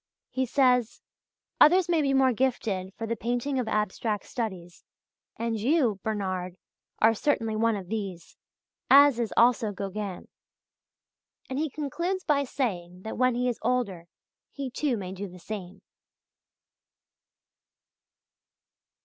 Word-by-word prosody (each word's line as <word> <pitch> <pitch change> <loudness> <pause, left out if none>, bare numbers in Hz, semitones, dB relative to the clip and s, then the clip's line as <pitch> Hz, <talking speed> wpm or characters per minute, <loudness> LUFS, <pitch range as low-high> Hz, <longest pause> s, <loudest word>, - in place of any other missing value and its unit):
He 260 0 -1
says: 250 -3 +2 0.6
"Others 360 +4 +6
may 335 -3 +2
be 275 -2 +1
more 265 -1 +4
gifted 215 -7 -1
for 225 - -4
the 230 +1 -2
painting 245 +4 -1
of 245 - -2
abstract 210 0 -1
studies, 185 -7 -5 0.5
and 230 -1 -2
you 245 - +2
[Bernard] 185 -4 -3 0.4
are 225 +1 +5
certainly 225 -2 0
one 225 0 +2
of 190 -3 -6
these, 195 -5 -5 0.5
as 280 -2 +7
is 230 -2 -1
also 235 -2 +4
Gauguin." 200 -1 -5 1.2
And 260 - -1
he 310 0 0
concludes 340 +7 -3
by 280 -2 +2
saying 185 -9 -3
that 220 - -6
when 255 -1 +3
he 250 +1 0
is 245 - -2
older 200 -9 -1 0.4
he 275 -3 -5
too 270 -2 0
may 185 -3 -5
do 195 +2 -5
the 180 0 -12
same. 185 0 -7
230 Hz, 130 wpm, -27 LUFS, 200-260 Hz, 1.2 s, as